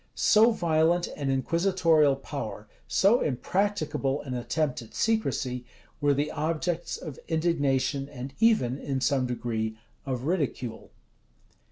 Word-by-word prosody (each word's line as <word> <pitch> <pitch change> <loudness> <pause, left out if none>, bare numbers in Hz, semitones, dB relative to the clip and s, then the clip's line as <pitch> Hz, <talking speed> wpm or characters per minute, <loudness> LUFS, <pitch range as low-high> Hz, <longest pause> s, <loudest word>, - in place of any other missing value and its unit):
[*] - - -41
So 220 +2 +5
violent 170 -4 +2
an 140 -2 -2
inquisitorial 165 +1 +3
power, 135 -6 -6 0.2
so 210 +6 +4
impracticable 155 -2 0
an 130 - -5
attempt 125 +3 -1
at 115 - -13
secrecy, 140 - 0 0.4
were 145 -1 +3
the 145 +2 -1
objects 165 +2 -2
of 150 -5 -8
indignation, 145 -4 0
and 135 -1 -7
even, 180 - +3
in 135 -2 -2
some 130 -1 +1
degree, 110 -3 -3 0.3
of 130 -2 -2
ridicule. 140 -8 -2
145 Hz, 125 wpm, -27 LUFS, 130-170 Hz, 0.4 s, So